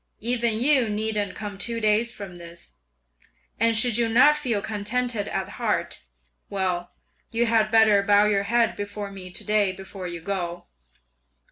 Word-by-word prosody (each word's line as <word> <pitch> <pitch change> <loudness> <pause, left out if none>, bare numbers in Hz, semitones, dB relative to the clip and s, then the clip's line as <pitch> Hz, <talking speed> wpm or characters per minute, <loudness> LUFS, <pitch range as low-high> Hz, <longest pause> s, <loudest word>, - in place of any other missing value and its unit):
Even 235 -1 +1
you 260 -3 +4
needn't 210 -1 -1
come 205 -2 -7
two 230 +2 -1
days 215 +2 +2
from 195 -6 -9
this; 170 - -12 0.8
and 230 0 +3
should 235 0 +3
you 235 -1 +1
not 255 +6 +5
feel 250 -8 -1
contented 220 +1 -2
at 190 -1 -3
heart, 210 -7 -2 0.5
well, 185 -3 -2 0.4
you 230 +1 0
had 225 -2 +2
better 220 -2 +5
bow 205 +1 +4
your 200 -1 +1
head 235 -1 +2
before 205 0 -6
me 190 -2 -8
to 180 - -2
day 210 -2 +2
before 190 0 -8
you 175 -1 -6
go. 175 -1 -4
210 Hz, 155 wpm, -24 LUFS, 195-230 Hz, 0.8 s, not